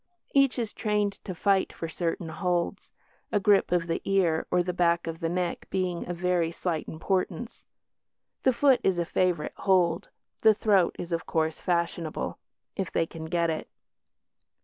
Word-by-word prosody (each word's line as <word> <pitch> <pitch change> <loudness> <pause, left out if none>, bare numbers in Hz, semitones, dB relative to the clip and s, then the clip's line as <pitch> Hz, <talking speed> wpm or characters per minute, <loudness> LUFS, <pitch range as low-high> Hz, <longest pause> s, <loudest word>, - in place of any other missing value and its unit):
Each 275 -2 +4
is 230 -3 -2
trained 210 -2 0
to 185 - -5
fight 195 +2 +2
for 165 - -5
certain 165 0 -3
holds, 175 0 -1 0.4
a 205 - +3
grip 200 -2 +3
of 175 -2 +2
the 165 0 -2
ear 180 -5 +1
or 180 - +2
the 180 0 -2
back 170 -1 +2
of 165 0 -5
the 165 - -1
neck 175 0 -2
being 180 -2 -2
of 175 - -3
very 180 -2 +1
slight 165 -1 -3
importance. 185 +4 -3 0.7
The 260 - +4
foot 265 +1 +4
is 190 -2 +2
a 170 - 0
favourite 175 -3 0
hold, 180 -2 +2 0.3
the 220 -1 +6
throat 200 -5 +3
is, 175 - -6
of 165 0 -2
course, 160 -1 0
fashionable 170 -2 -2 0.4
if 190 -2 -3
they - - +1
can 160 -1 -8
get 170 0 +1
it. 155 - -5
175 Hz, 170 wpm, -27 LUFS, 165-195 Hz, 0.7 s, the